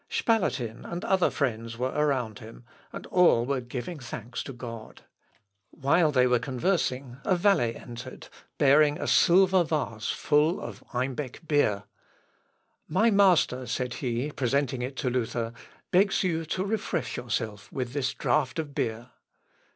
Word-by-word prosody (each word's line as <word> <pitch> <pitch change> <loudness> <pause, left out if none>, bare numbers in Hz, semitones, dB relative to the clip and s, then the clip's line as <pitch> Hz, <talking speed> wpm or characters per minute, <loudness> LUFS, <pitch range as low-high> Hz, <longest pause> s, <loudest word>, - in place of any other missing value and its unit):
Spalatin 130 - 0
and 170 +1 -5
other 190 -2 +3
friends 115 -4 -2
were 130 +2 -1
around 130 -7 0
him, 115 +1 -12 0.3
and - - -8
all 170 -10 +4
were 135 0 -1
giving 125 +7 -6
thanks 120 -1 -6
to - - -7
God. 115 -3 -9 0.7
While 155 +4 +2
they 125 -3 +4
were 125 -1 +3
conversing, 130 -1 -1
a 185 - +2
valet 175 - +2
entered, 120 +2 -9 0.3
bearing 145 +1 +5
a - - -3
silver 185 0 +5
vase 140 -9 -2
full 150 +4 +2
of - - -8
Eimbeck 130 +4 -4
beer. 110 -10 +2 1.0
"My 230 +1 +3
master," 180 -11 +3
said 125 +1 -2
he, 125 +3 -2
presenting 135 -1 0
it 130 +2 -4
to 130 - -1
Luther, 115 -1 -2 0.4
"begs 195 +2 +3
you 165 -3 -1
to 185 +4 -2
refresh 195 - -2
yourself 110 -4 -4
with 125 -2 -4
this 135 -3 -1
draught 130 -1 0
of 155 -3 -4
beer." 115 0 -3
130 Hz, 145 wpm, -27 LUFS, 120-160 Hz, 1.0 s, bearing